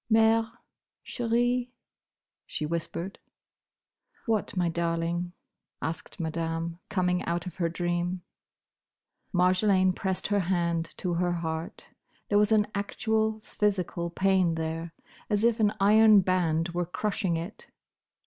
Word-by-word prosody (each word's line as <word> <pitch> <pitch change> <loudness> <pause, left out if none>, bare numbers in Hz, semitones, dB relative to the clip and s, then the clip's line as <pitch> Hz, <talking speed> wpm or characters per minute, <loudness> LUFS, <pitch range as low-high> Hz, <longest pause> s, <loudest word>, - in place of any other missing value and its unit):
"Mère, 225 0 +4 0.5
chérie," 245 +1 0 0.8
she 155 - -3
whispered. 170 +3 -4 1.1
"What, 220 -4 -1
my 175 -1 +2
darling?" 170 +1 -1 0.5
asked 160 +3 -5
Madame, 165 +1 -3
coming 180 -3 +1
out 170 +2 -1
of 180 - -7
her 170 -2 +1
dream. 175 +1 -2 1.1
Marjolaine 185 +1 +3
pressed 190 0 -3
her 205 -1 +2
hand 170 -3 0
to 180 -2 -1
her 175 +1 +1
heart. 160 -1 -4 0.4
There 205 - +4
was 210 +1 +3
an 215 -1 +5
actual 220 +2 -1
physical 185 -5 -1
pain 185 -1 +2
there, 165 +1 -3 0.4
as 210 0 +1
if 235 0 +3
an 210 -2 +4
iron 210 +1 +7
band 175 -3 +1
were 175 0 -2
crushing 190 -2 -1
it. 170 +6 -7
180 Hz, 120 wpm, -28 LUFS, 170-210 Hz, 1.1 s, iron